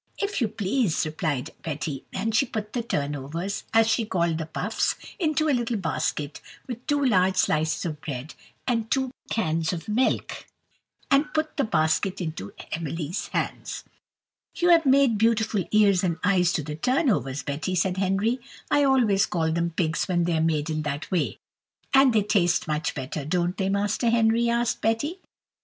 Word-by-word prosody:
"If 400 -7 -2
you 230 - +3
please," 210 -3 0
replied 155 -2 -2
Betty; 150 -3 -4
and 220 +3 -2
she 260 +4 +3
put 215 -2 -5
the 245 - 0
turnovers, 150 - -3
as 225 0 +5
she 225 +1 +2
called 170 -6 0
the 160 - -4
puffs, 205 +7 -1 0.2
into 310 -2 +1
a 295 - +3
little 240 -2 0
basket, 155 -4 -2 0.2
with 245 -1 -7
two 290 -2 +2
large 190 -5 +3
slices 160 -3 +1
of 155 -3 -4
bread 140 0 -6 0.3
and 230 -3 0
two 265 -1 0 0.2
cans 160 -6 0
of 170 +4 -6
milk, 230 +5 0 0.6
and 285 +2 +3
put 310 0 -1
the 280 - +1
basket 170 -1 +1
into 160 - -5 0.2
Emily's 165 +2 -3
hands. - - -3 0.7
"You 350 - +2
have 330 -4 +5
made 265 -5 +4
beautiful 220 -4 +2
ears 200 -3 +4
and 170 -3 0
eyes 180 -2 +3
to 155 - -1
the 150 +1 -5
turnovers, 200 - +1
Betty," 155 +6 -2
said 180 +1 +1
Henry; 195 +6 +1 0.3
"I 290 0 +4
always 235 -7 +3
call 160 -2 0
them 170 +1 0
pigs 165 -1 -1
when 175 -2 +1
they 170 -1 +1
are 160 - +1
made 160 -1 0
in 155 0 -1
that 145 0 -4
way." 180 -4 0 0.6
"And 270 -1 +6
they 215 -3 +3
taste 180 -6 +2
much 155 0 -1
better, 140 +2 -4
don't 175 +4 0
they, 195 -1 -1
Master 205 +4 +1
Henry?" 230 0 +3
asked 235 +1 0
Betty. 255 - 0
190 Hz, 170 wpm, -25 LUFS, 160-235 Hz, 0.7 s, And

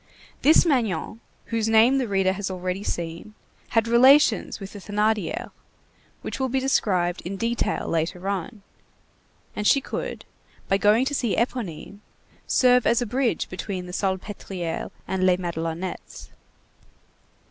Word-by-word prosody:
This 315 +4 +6
Magnon, 225 - 0 0.3
whose 225 -1 -1
name 230 +5 +5
the 255 - -1
reader 195 -2 +1
has 195 0 -4
already 185 +1 -3
seen, 170 +4 -5 0.3
had 225 0 +1
relations 255 +1 +5
with 195 -1 -9
the 205 - -8
Thénardier, 210 +2 -1 0.7
which - - -5
will 265 -1 0
be 265 +2 0
described 185 -9 +1
in 195 +3 -5
detail 230 +3 -1
later 170 +3 -2
on, 200 +2 -4 0.9
and 210 - -1
she 275 - +5
could, 270 - -5 0.4
by 195 - +2
going 215 +5 +4
to 285 - -2
see 240 -6 0
Éponine, 210 -5 -3 0.5
serve 250 -2 +4
as 235 +1 +3
a - - -3
bridge 245 -3 0
between 185 0 -5
the 180 - -8
Salpêtrière 190 -3 -3 0.2
and 190 -1 -1
Les 185 -1 +4
Madelonettes. 170 0 -5
205 Hz, 135 wpm, -24 LUFS, 185-235 Hz, 0.9 s, This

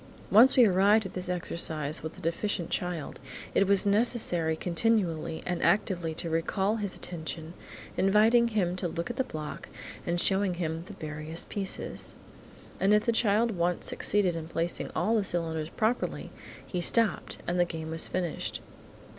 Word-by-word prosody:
Once 240 +7 +7
we 245 - +8
arrived 200 +2 +4
at 190 - -7
this 180 -1 -5
exercise 160 -4 0
with 160 +3 -7
a - - -10
deficient 170 +1 -2
child, 175 -4 -3 0.3
it 195 - +3
was 200 0 +4
necessary 200 -6 +2
continually 170 -3 0
and 180 -1 -2
actively 175 -5 +1
to 170 - -3
recall 190 +6 0
his 205 -3 -3
attention, 160 -1 -6 0.4
inviting 220 +5 +4
him 195 -6 0
to 185 -1 -2
look 170 +6 -4
at - - -8
the 265 - +2
block 155 -9 -7 0.4
and 175 0 0
showing 190 0 +2
him 165 -2 -3
the 210 - -9
various 155 -1 -5
pieces. 195 -2 -3 0.6
And 200 +2 +4
if 210 - +2
the 235 - +3
child 225 0 +2
once 175 -2 -1
succeeded 195 -4 +1
in 160 -1 -5
placing 165 +1 -2
all 225 - +1
the 210 - +1
cylinders 160 -4 -1
properly, 225 +6 -1 0.3
he 180 - -3
stopped, 225 +4 +1
and 175 +1 -1
the - - +6
game 160 -2 -6
was 165 0 +2
finished. 175 -3 -3
180 Hz, 165 wpm, -29 LUFS, 165-205 Hz, 0.6 s, we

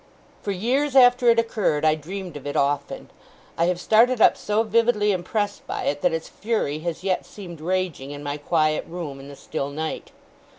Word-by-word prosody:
For - - -5
years 255 +9 0
after 245 -1 +6
it 230 - +5
occurred, 210 -10 +1
I 155 - +5
dreamed 175 +3 -7
of 145 -1 -7
it 145 - -4
often. 140 +1 -1 0.4
I 170 - +2
have 180 0 0
started 230 +5 +4
up - - +6
so 210 +2 0
vividly 225 -1 +2
impressed 205 +3 -2
by - - -3
it, 145 0 -1
that - - +3
its 165 0 -3
fury 210 -10 -2
has 170 +1 -4
yet 190 -2 0
seemed 175 -6 -10
raging 175 -5 -2
in 145 0 -7
my 145 0 -3
quiet 155 +1 +1
room, 165 -5 -6
in 135 - -11
the 140 - -10
still 140 0 -4
night. 155 +2 -5
180 Hz, 195 wpm, -23 LUFS, 150-215 Hz, 0.4 s, after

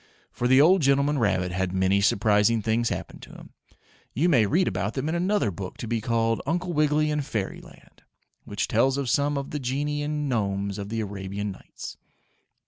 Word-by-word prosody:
For 120 - -1
the 130 +1 +5
old 175 +5 +6
gentleman 140 +1 +2
rabbit 95 -5 +1
had 90 0 -2
many 95 +1 +2
surprising 105 +2 +3
things 115 +2 +1
happen - - -5
to - - -13
him. - - -13 0.6
You 165 +8 +2
may 120 -10 +4
read 175 - +2
about 100 +3 -2
them 140 +2 -2
in - - -1
another 180 - +1
book 95 +1 -7
to 115 - -6
be 115 0 -1
called 115 0 0
"Uncle 175 +3 -1
Wiggily 150 0 +2
In 150 0 0
Fairyland," 110 -9 -7 0.4
which - - -3
tells 135 +1 +2
of 135 -3 -1
some 145 0 +1
of 140 0 -5
the 150 - -3
Genii 145 +3 -2
and 150 0 -2
Gnomes 100 -4 -1
of 100 0 -6
the 115 0 -2
Arabian 100 0 -4
Nights. 95 - -10
120 Hz, 190 wpm, -25 LUFS, 100-145 Hz, 0.6 s, old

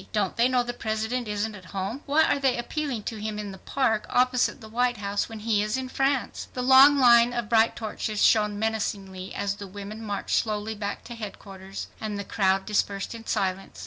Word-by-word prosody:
Don't 205 -4 0
they 235 +1 +4
know 255 -1 +2
the 245 0 -4
President 220 +1 -2
isn't 210 +1 -2
at 190 -4 -11
home? 195 +9 -3
Why 300 +3 +4
are 285 - +2
they 270 -2 +2
appealing 250 -2 -3
to 225 - -5
him 215 0 -4
in 205 -1 -5
the 190 - -11
park 225 -4 0
opposite 250 +1 +2
the 220 - -11
White 245 +2 0
House 200 0 -2
when 220 -1 -8
he 215 -2 +1
is 215 +4 -1
in 260 -1 -4
France?" 270 -1 -1
The 250 - -2
long 265 +3 +8
line 240 -2 +6
of 240 -3 -3
bright 225 0 +4
torches 215 -1 -4
shone 210 -2 +3
menacingly 200 -4 -3
as 200 0 -2
the 200 - -8
women 205 +3 -8
marched 205 -2 -1
slowly 215 0 -1
back 205 -1 -5
to 240 - -8
headquarters, 195 -3 -8
and 215 -2 -4
the 200 - -3
crowd 195 -2 +1
dispersed 200 -1 -1
in 230 -1 -10
silence. 190 0 -2
220 Hz, 210 wpm, -26 LUFS, 205-245 Hz, -, long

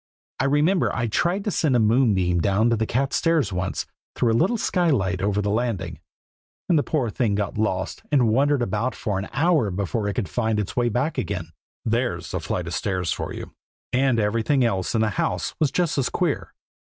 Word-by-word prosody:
I 135 - +1
remember 150 +6 +2
I 120 - 0
tried 175 - 0
to 210 - -1
send 155 -7 +1
a - - +4
moonbeam 105 -7 +3
down 100 +6 +2
the 110 -1 +1
cat's 135 +3 0
stairs 160 - +1
once, 90 +1 -2 0.3
through 120 - +2
a - - +2
little 185 - +2
skylight 135 - +1
over 105 +1 0
the 100 - 0
landing; 115 -3 -2 0.7
and 175 - +3
the - - +3
poor 135 -7 -1
thing 110 -3 0
got 105 -1 -2
lost 95 -3 -1
and 130 -5 +4
wandered 140 +3 +2
about 115 +4 -1
for 100 -4 -2
an 95 - -6
hour 155 - +2
before 100 +3 -2
it 100 - -2
could 110 -7 -1
find 110 +4 0
its 105 - -3
way 120 -1 +2
back 125 +8 -1
again. 90 -5 -4 0.3
There's 110 -7 -1
a - - -1
flight 90 - -3
of 85 - -5
stairs 90 -5 -1
for - - -5
you! - - -7 0.4
and 130 -2 +3
everything 115 +5 +2
else 95 -2 -1
in 110 - +2
the 110 -1 +1
house - - -1
was 155 - +3
just 170 -3 0
as 130 - +1
queer. 175 -5 -1
115 Hz, 205 wpm, -24 LUFS, 100-140 Hz, 0.7 s, a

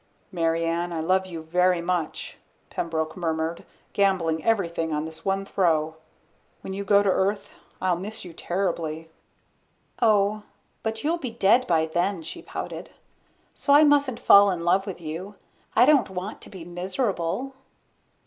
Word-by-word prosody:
"Mary 165 -2 0
Ann, 170 +1 -1
I 165 - -3
love 185 +4 +1
you 165 -3 -7
very 180 +2 +2
much," 170 -1 -3 0.3
Pembroke 160 -1 -2
murmured, 165 -1 -2 0.3
gambling 180 -5 +1
everything 170 -7 0
on 150 0 -1
this 160 0 -9
one 195 0 -1
throw. 160 -5 +1 0.7
"When 190 - -6
you 200 +1 -4
go 200 0 +4
to 200 - +2
Earth 200 +2 0 0.3
I'll 185 -2 +1
miss 200 +3 -7
you 175 - -9
terribly." 165 -3 -3 0.9
"Oh, 210 -2 +3 0.4
but 220 0 -3
you'll 330 +3 0
be 265 -6 -4
dead 230 +2 +3
by 160 -2 +3
then," 175 +2 -1
she - - -7
pouted. - - -7 0.6
"So 280 - +1
I 300 - +8
mustn't 285 -5 +3
fall 200 0 +7
in 180 -3 -2
love 190 +3 +2
with 190 - -5
you. 170 +5 -6 0.4
I - - +7
don't 275 -8 +4
want 190 +3 -6
to - - -12
be 185 -4 -10
miserable." 185 +6 -2
185 Hz, 155 wpm, -25 LUFS, 165-205 Hz, 0.9 s, I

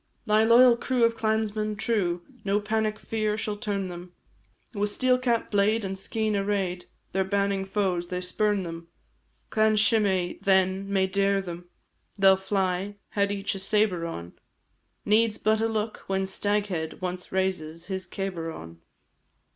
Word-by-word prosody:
Thy 215 -1 +4
loyal 235 +2 +7
crew 250 0 0
of 230 0 +3
clansmen 215 -1 -1
true, 195 -6 0 0.2
No 200 0 +1
panic 215 0 -1
fear 215 -1 -2
shall 210 -1 -2
turn 205 -3 -2
them, 175 0 -9 0.6
With 205 -1 0
steel 255 +4 +2
cap, 240 -3 0
blade, 210 +1 +2
and 195 0 -3
skene 215 +2 -1
array'd, 195 -3 -1 0.3
Their 190 +1 +1
banning 200 0 0
foes 190 -3 -1
they 180 0 -3
spurn 205 +2 0
them. 165 -1 -7 0.6
Clan 215 0 +3
Shimei 205 -5 +2
then 190 0 +2
may 190 -1 +3
dare 195 +1 +1
them, 175 -2 -7 0.5
They 195 -1 +6
'll 190 - +7
fly, 190 0 -1
had 200 -1 0
each 200 0 -2
a 195 - -6
sabre 195 -4 +1
on, 85 - -7 0.7
Needs 215 +1 +3
but 220 +1 +1
a 225 - +2
look 220 -1 -2
when 195 0 0
Staghead 195 -4 -1
Once 180 0 -5
raises 175 -4 -2
his 190 -1 -4
cabar 180 -4 -4
on. 85 - -10
200 Hz, 155 wpm, -26 LUFS, 185-215 Hz, 0.7 s, loyal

